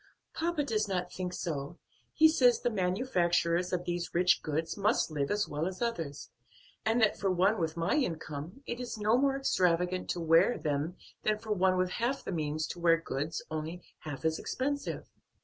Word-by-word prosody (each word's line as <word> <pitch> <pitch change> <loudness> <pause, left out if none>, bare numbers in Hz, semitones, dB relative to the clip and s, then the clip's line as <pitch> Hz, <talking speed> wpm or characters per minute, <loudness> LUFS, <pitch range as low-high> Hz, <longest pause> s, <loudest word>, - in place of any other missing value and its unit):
"Papa 330 -2 0
does 215 -5 0
not 180 -2 -2
think 180 -1 -3
so; 165 -3 -4 0.4
he 315 - +7
says 255 -6 +4
the 245 - +1
manufacturers 180 -4 +1
of 180 -1 -1
these 175 -1 -3
rich 180 0 +4
goods 160 +2 -2
must 205 -3 +1
live 145 -2 -1
as 205 0 +1
well 150 +3 -2
as 185 0 -5
others, 165 - -3 0.5
and 225 +2 +2
that 215 - +3
for 195 -1 +1
one 190 +4 +3
with 160 -1 -2
my 165 +7 +1
income, 170 - -3
it 240 - -4
is 245 -2 -5
no 215 +2 +3
more 270 +1 +2
extravagant 180 -7 +1
to 175 - -1
wear 165 +8 +4
them 150 +4 -2 0.2
than 215 0 +1
for 220 0 -7
one 190 -2 +3
with 185 0 +1
half 245 +7 -1
the - - -4
means 155 -2 -1
to 175 - -6
wear 165 -1 +4
goods 155 -1 -3
only 160 +3 -4 0.2
half 150 0 -7
as 160 0 +1
expensive." 285 +2 -3
180 Hz, 185 wpm, -31 LUFS, 165-220 Hz, 0.5 s, he